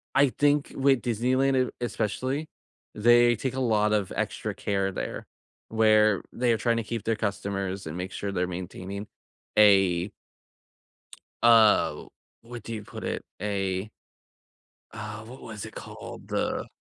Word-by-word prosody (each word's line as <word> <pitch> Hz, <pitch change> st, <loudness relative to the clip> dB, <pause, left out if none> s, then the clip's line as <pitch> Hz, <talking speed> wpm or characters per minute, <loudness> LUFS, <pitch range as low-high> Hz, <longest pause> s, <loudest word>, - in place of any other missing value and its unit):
I 140 Hz, -1 st, +5 dB
think 145 Hz, +2 st, +1 dB
with 135 Hz, -1 st, +3 dB
Disneyland, 130 Hz, +3 st, +1 dB
it -, -, -11 dB
especially, 125 Hz, +7 st, -2 dB, 0.5 s
they 120 Hz, +2 st, +5 dB
take 130 Hz, +3 st, -3 dB
a -, -, -2 dB
lot 105 Hz, -4 st, +2 dB
of 100 Hz, -3 st, 0 dB
extra -, -, -2 dB
care 100 Hz, -1 st, -1 dB
there, -, -, -5 dB, 0.4 s
where 110 Hz, -2 st, +4 dB
they're 120 Hz, -1 st, +1 dB
trying 115 Hz, 0 st, +1 dB
to 115 Hz, -, -1 dB
keep 115 Hz, 0 st, -4 dB
their 115 Hz, 0 st, +1 dB
customers, 100 Hz, -2 st, -3 dB
and 80 Hz, +3 st, -5 dB
make 90 Hz, +1 st, -4 dB
sure 100 Hz, -1 st, -3 dB
they're 90 Hz, -1 st, 0 dB
maintaining 95 Hz, +3 st, -6 dB, 0.5 s
a 95 Hz, -3 st, +5 dB, 1.3 s
uh, 115 Hz, -3 st, +5 dB, 0.4 s
what 115 Hz, -1 st, -9 dB
do 115 Hz, -, -6 dB
you 105 Hz, -2 st, -5 dB
put -, -, -9 dB
it? -, -, -3 dB, 0.2 s
A 95 Hz, -1 st, -2 dB, 1.0 s
Uh, 110 Hz, 0 st, -7 dB
what 125 Hz, +3 st, -11 dB
was 110 Hz, -3 st, -7 dB
it -, -, -11 dB
called? -, -, -9 dB
The -, -, -1 dB
110 Hz, 145 wpm, -27 LUFS, 100-120 Hz, 1.3 s, I